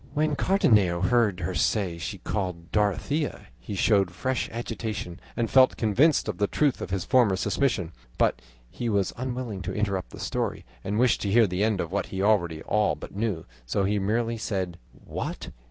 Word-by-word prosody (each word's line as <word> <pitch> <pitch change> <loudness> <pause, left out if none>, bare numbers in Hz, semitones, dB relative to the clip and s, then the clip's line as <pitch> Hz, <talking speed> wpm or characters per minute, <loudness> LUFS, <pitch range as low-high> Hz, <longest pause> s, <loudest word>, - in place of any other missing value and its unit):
'" - - -23
When 150 0 +1
Cardenio 105 - +3
heard 105 -3 +2
her 90 +2 -2
say 90 0 0
she 80 - -4
was - - -27
called 90 -5 -3
Dorothea, 105 - 0
he 100 +12 -6
showed 100 -1 +3
fresh 125 +8 -2
agitation 110 -6 -4 0.2
and 115 - +1
felt 130 +1 +5
convinced 130 +8 +3
of 105 -5 -3
the 100 - +2
truth 145 +2 +1
of - - -4
his 95 -3 -2
former 120 -7 +4
suspicion, 95 - 0 0.3
but - - +2 0.3
he 120 - -3
was 100 -3 +1
unwilling 125 -5 -4
to 95 +1 -4
interrupt 100 -3 -1
the - - -11
story, - - -2 0.2
and 105 +2 -2
wished 125 +1 +3
to 100 - -1
hear 115 +2 +6
the 90 +1 -1
end 110 -3 +1
of 85 -1 -3
what 100 - -1
he 95 - -5
already 85 -7 +2
all 105 0 +1
but - - -10
knew, 105 -6 -2 0.2
so 100 - 0
he 100 +2 +1
merely 115 +3 0
said: 95 -5 -3
"What! - - -6
105 Hz, 190 wpm, -26 LUFS, 95-115 Hz, 0.3 s, hear